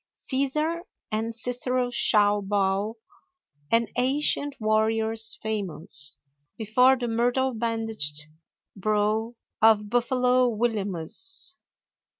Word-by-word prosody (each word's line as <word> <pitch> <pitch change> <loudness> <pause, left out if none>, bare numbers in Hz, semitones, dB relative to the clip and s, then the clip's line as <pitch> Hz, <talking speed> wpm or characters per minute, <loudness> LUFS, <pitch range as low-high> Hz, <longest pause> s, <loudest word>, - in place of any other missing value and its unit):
Cæsar 300 +5 0 0.3
and 225 +1 -2
Cicero 250 +1 -1
shall 205 -3 +4
bow, 200 +2 -1 0.7
And 230 0 +3
ancient 285 +2 +1
warriors 220 0 +1
famous, 170 -9 -3 0.4
Before 250 +4 +3
the 240 -1 -3
myrtle 245 +3 0
bandaged 225 -10 -2 0.5
brow 215 +3 0 0.3
Of 210 -1 +4
Buffalo 250 +1 +2
Williamus. 225 - 0
225 Hz, 85 wpm, -25 LUFS, 210-250 Hz, 0.7 s, shall